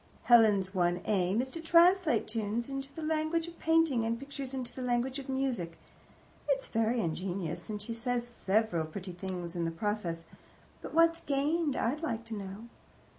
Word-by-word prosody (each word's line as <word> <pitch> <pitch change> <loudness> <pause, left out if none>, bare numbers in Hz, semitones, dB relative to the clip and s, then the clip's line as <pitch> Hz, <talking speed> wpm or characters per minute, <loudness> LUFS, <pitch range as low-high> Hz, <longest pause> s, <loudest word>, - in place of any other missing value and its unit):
Helen's 210 -5 +5
one 175 -1 +2
aim 195 +3 +2
is 260 - -8
to 330 - -5
translate 335 - +4
tunes 225 +3 -2
into 275 0 -4
the 320 +3 -7
language 315 +1 0
of 340 - -11
painting, 325 -7 +3
and 230 +1 0
pictures 275 -1 -6
into 255 -3 -5
the 260 - -7
language 250 +2 0
of 270 - -9
music. 250 -11 -1 0.7
It's - - +1
very 225 +1 +1
ingenious, 175 0 -3
and 210 -1 -3
she 210 +3 -5
says 240 +1 -1
several 205 -7 0
pretty 185 +3 -6
things 180 -1 -5
in 170 - -1
the 165 - 0
process, 170 -2 -3 0.6
but - - -7
what's 330 0 +4
gained, 290 +1 0
I'd 270 +7 0
like 230 -8 -3
to 230 - -7
know? 200 +2 -6
235 Hz, 175 wpm, -31 LUFS, 195-280 Hz, 0.7 s, Helen's